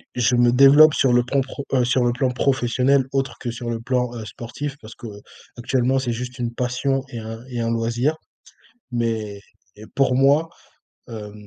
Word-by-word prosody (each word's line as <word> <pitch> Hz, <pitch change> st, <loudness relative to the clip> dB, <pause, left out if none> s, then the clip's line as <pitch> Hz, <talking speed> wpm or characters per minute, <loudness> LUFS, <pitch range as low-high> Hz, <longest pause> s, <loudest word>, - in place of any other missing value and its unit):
je 125 Hz, 0 st, +2 dB
me 120 Hz, 0 st, +4 dB
développe 140 Hz, +4 st, +7 dB
sur 130 Hz, -3 st, +2 dB
le 120 Hz, 0 st, +4 dB
plan 135 Hz, +3 st, 0 dB
pro 135 Hz, +2 st, -7 dB
heu, 125 Hz, -2 st, +3 dB
sur 125 Hz, +1 st, +1 dB
le 120 Hz, -, +2 dB
plan 130 Hz, +1 st, 0 dB
professionnel, 130 Hz, +1 st, +1 dB
autre 135 Hz, -1 st, -1 dB
que 120 Hz, -, -4 dB
sur 120 Hz, +1 st, -6 dB
le 115 Hz, -1 st, -3 dB
plan, 125 Hz, +1 st, -1 dB
heu, 110 Hz, -2 st, -7 dB
sportif, 135 Hz, +6 st, -7 dB
parce 110 Hz, +1 st, -12 dB
qu'actuellement, 120 Hz, +3 st, -3 dB
c'est 130 Hz, -2 st, -2 dB
juste 125 Hz, +2 st, -6 dB
une 120 Hz, -1 st, -2 dB
passion 130 Hz, +2 st, -1 dB
et 120 Hz, -, -6 dB
un 115 Hz, +1 st, -8 dB
et 125 Hz, -2 st, -5 dB
un 115 Hz, -, -1 dB
loisir 120 Hz, +6 st, 0 dB, 0.8 s
mais 110 Hz, -4 st, -2 dB, 0.4 s
et 105 Hz, -, -11 dB
pour 135 Hz, -2 st, +2 dB
moi, 140 Hz, +5 st, +3 dB, 0.6 s
hem, 105 Hz, -2 st, -8 dB
125 Hz, 185 wpm, -22 LUFS, 115-135 Hz, 0.8 s, développe